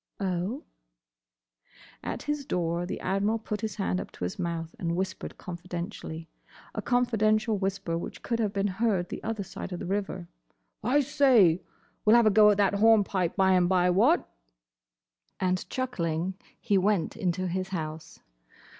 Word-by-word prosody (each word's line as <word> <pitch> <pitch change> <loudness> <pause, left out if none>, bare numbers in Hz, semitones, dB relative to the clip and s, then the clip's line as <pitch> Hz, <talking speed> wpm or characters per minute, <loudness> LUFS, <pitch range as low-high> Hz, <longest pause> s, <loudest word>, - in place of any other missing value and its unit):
"Oh?" 195 - -2 1.4
At - - -4
his 295 -1 -2
door 175 -6 -1
the - - -4
Admiral 200 +4 +1
put 210 -2 -5
his 215 -4 -3
hand 90 +1 -1
up - - -8
to - - -8
his 90 - -3
mouth 170 -2 -3
and 170 -1 -1
whispered 190 +1 -4
confidentially—a 175 -2 -7
confidential 220 -3 +2
whisper 195 -3 -2
which - - -8
could 230 -1 -1
have 215 -3 +1
been 200 0 -1 0.2
heard 195 -7 +1
the - - -6
other 220 -2 -2
side 190 +1 -7
of 180 - -3
the 190 - -6
river—"I 195 +7 -3
say!—We 235 - +2
'll - - +8
have 235 -1 +6
a 215 - +5
go 210 +1 +7
at 205 - +3
that 200 -1 +3
horn 220 +1 +5
pipe 185 -3 -1
by 190 -1 +4
and 180 -1 +4
by—what?" 190 - +3 1.1
And 185 0 -1
chuckling 180 -9 -2 0.3
he 205 -4 +2
went 195 -3 +1
into 185 -3 -1
his 185 +1 -2
house. 160 -4 -6
190 Hz, 155 wpm, -28 LUFS, 175-215 Hz, 1.4 s, ll